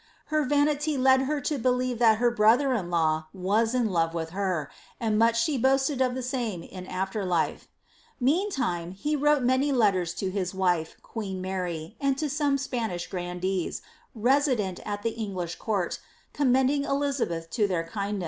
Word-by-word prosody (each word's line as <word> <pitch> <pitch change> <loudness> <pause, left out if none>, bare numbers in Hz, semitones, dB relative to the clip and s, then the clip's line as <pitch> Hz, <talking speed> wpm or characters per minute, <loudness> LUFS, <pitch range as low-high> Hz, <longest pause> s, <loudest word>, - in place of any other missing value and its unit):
Her 305 0 +3
vanity 290 +1 +1
led 265 0 +5
her 300 -1 0
to 285 +1 -1
belief 250 0 0
that 225 -2 +5
her 240 +1 +3
brother 240 +5 +4
in 190 -8 -2
law 160 -2 +1
waa 200 +5 +2
in 250 -1 +1
love 165 -1 +1
with 160 -1 -3
beE^nd 185 -6 -2 0.5
much 230 +1 +3
aha 295 -3 0
boaatad 270 +2 +2
of 250 -1 0
the 260 - -3
tame 240 -9 -3
in 185 -1 -9
after 190 +3 -2
life. 175 -3 -1 0.5
Meantime 255 - 0
he 295 +11 -1
wrote 295 -1 +3
nnmy 260 +3 +2
letten 205 -8 +3
to 185 +3 -3
hM 190 -1 -3
wift^ 175 -4 +1
qneen 205 -4 -5
Mary, 185 0 -4
and 275 -1 +1
to 310 - -1
eome 290 -1 +1
Spaaiah 230 -10 -3
grandeee, 180 0 -2 0.4
reaident 245 -6 +2
at 205 0 -4
tha 230 - 0
EngKrii 190 -6 -4
court, 200 -6 -1 0.3
commending 270 +1 +2
Elisabeth 275 -14 -1
to 215 -4 +2
their 180 -4 -1
kindncec. 200 +4 -3
220 Hz, 165 wpm, -27 LUFS, 185-265 Hz, 0.5 s, led